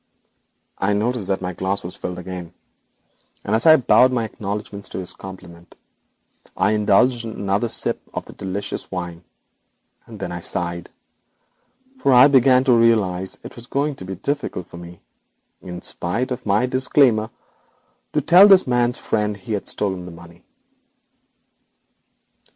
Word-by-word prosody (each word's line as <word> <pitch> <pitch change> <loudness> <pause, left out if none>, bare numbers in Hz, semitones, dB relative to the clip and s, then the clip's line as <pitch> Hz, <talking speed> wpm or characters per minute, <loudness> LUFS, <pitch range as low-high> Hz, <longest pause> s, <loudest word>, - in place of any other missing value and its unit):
I 105 +2 +1
noticed 110 0 -1
that 95 -1 -1
my 90 0 -3
glass 95 +3 -2
was 90 - -7
again 90 -1 -6 0.9
filled, 110 +3 +1
and 155 -6 +6
bowing 130 0 +5
an 115 - 0
acknowledgment 105 -1 -6
of - - -3
his 90 - -6
compliment, 90 -3 -12 0.8
I - - +2
indulged 110 +4 +2
in 115 -1 -6
another 100 +4 -1
sip - - -2
of - - -5
the - - -12
delicious 100 +1 -5
wine. 90 -2 -6 0.8
I - - -6
sighed, 85 0 -4 1.1
for 140 - +2
I 125 +2 +8
began 130 -1 +5
to 130 -2 +4
realise 105 -6 +2
it - - -10
was 120 0 -12
going 145 +2 -1
to 95 - -9
be 95 - -5
very - - -23
difficult 140 - -3
for - - -10
me, 85 0 -11 0.6
in 90 -1 -8
spite 115 +10 -3
of 125 - -5
my 105 +4 +2
disclaimer, 125 -3 +2 0.8
to 150 - +1
tell 175 +7 +7
this 195 -2 +6
man's 120 -1 +1
friend 105 -1 -2
he 100 +3 -6
had 100 - -3
stolen 95 -3 -2
the - - -8
money. 85 +1 -15
105 Hz, 145 wpm, -21 LUFS, 90-125 Hz, 1.1 s, I